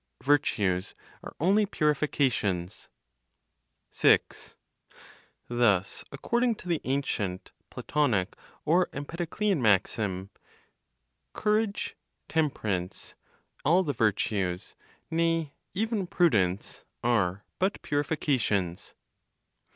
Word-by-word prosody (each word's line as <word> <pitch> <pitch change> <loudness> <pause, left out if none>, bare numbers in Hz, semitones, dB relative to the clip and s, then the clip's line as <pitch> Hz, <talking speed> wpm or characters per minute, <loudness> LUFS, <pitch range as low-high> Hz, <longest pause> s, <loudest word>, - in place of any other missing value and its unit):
VIRTUES 100 -10 +1 0.3
ARE - - -9
ONLY 200 +5 +3
PURIFICATIONS. 130 - 0 1.0
6. - - +2 0.9
Thus, 105 -6 +1
according 235 - 0
to 185 - -12
the 170 -3 0
ancient 110 -9 -2 0.2
(Platonic 120 -11 0 0.3
or 175 +4 +4
Empedoclean) 170 +5 -1
maxim, 100 -2 +1 1.0
"courage, 210 -1 0 0.3
temperance, 110 - -2 0.5
all 175 +6 +4
the 145 -5 -1
virtues, 100 -5 0 0.4
nay, 165 -2 +1 0.2
even 215 -2 -1
prudence, 105 - +1 0.2
are 105 -5 +1 0.2
but 190 +2 +1
purifications." 130 - -1
140 Hz, 75 wpm, -28 LUFS, 100-170 Hz, 1.0 s, or